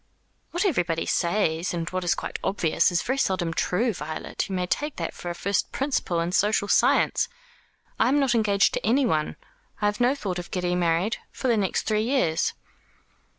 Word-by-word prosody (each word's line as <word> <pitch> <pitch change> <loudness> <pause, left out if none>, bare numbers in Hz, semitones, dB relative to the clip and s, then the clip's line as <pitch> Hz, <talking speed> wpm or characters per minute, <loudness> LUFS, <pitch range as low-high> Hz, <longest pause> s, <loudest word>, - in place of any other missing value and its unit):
"What 350 +4 -1
everybody 175 - 0
says, 170 -2 0
and 165 -1 -3
what 185 0 -2
is 175 - +2
quite - - -5
obvious, 180 -3 +2
is 175 - +1
very 265 +2 -1
seldom 185 -8 0
true, 220 +8 0
Violet. 155 +2 -5
You 190 - -2
may 180 -1 0
take 295 +10 -2
that - - -4
for 175 - -7
a 175 - -4
first 200 +2 -1
principle 260 -11 -1
in 170 +1 -2
social 205 +2 +2
science. 470 - +3 0.7
I 225 - +4
am 285 +2 +3
not 270 -3 +2
engaged 205 -3 +3
to - - -2
anyone. 225 - +1 0.4
I 210 - -1
have 205 +3 0
no 250 +3 +3
thought 190 -9 -3
of 175 - -8
getting 180 -1 -1
married 175 +7 +1
for 260 - -2
the 235 - +4
next 200 -3 0
three 215 -1 +1
years." 225 - +1
195 Hz, 190 wpm, -25 LUFS, 175-235 Hz, 0.7 s, I